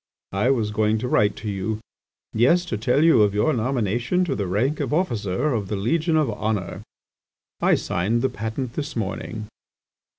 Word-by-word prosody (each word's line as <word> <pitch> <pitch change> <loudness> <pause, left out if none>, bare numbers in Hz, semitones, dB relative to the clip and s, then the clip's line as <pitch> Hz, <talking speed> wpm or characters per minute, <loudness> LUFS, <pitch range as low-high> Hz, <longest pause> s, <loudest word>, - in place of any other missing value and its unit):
I 100 +6 +1
was 115 -6 +1
going 110 +1 +1
to 120 +3 -3
write 105 -4 +2
to 110 - -7
you.... 105 +2 -2 0.6
Yes, 170 +11 +3
to 145 - -3
tell 125 +7 +2
you 160 -9 +6
of 105 -1 +3
your 130 +9 +2
nomination 120 - 0
to 140 -6 -1
the 100 -4 -2
rank 120 +11 0
of 150 - -1
officer 120 - 0
of 105 -4 -2
the 105 - -2
Legion 160 - +1
of 155 -3 +2
Honour. 105 -3 -3 0.8
I - - +4
signed 110 +8 -1
the - - +4
patent 115 +1 -4
this 150 +2 -4
morning." 110 0 -4
115 Hz, 175 wpm, -23 LUFS, 105-135 Hz, 0.8 s, you